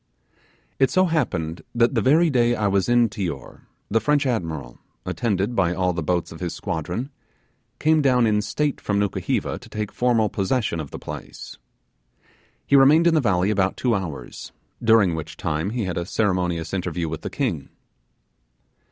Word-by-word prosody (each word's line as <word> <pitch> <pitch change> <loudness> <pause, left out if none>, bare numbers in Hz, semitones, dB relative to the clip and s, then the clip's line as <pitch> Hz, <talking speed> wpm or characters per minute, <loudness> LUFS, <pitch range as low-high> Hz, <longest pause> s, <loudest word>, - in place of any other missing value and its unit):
It 135 - +4
so 185 0 +3
happened 90 - -1
that 120 0 +3
the - - +1
very 155 +5 +4
day 120 -2 +3
I 105 - -1
was 100 0 +1
in 120 -1 +4
Tior 85 - -6 0.3
the 115 - +2
French 145 +5 +1
admiral, 80 - -3 0.3
attended 105 -1 -1
by 90 -3 +1
all 90 0 +1
the 85 - -3
boats 85 +2 -1
of 80 - -10
his 90 -2 -4
squadron, 90 - -4 0.7
came 155 0 +3
down 125 -4 +3
in 105 -1 +2
state 130 +8 -2
from 100 - -1
Nukuheva 100 -2 -1
to - - -15
take 105 -1 -4
formal 120 -3 +2
possession 100 -3 -1
of 75 -3 -5
the - - -7
place. - - -9 1.1
He 140 - +3
remained 145 +5 +6
in 170 - +5
the 155 - +3
valley 95 -4 +2
about 95 -2 0
two 125 -2 +1
hours, 90 -9 -5 0.3
during 110 -6 +5
which 80 -1 -6
time 80 +4 -2
he 115 +1 -2
had 90 -2 -2
a 85 - -3
ceremonious 90 -6 -1
interview 85 -3 -2
with 80 0 -5
the - - -5
king. - - -2
105 Hz, 170 wpm, -23 LUFS, 90-125 Hz, 1.1 s, remained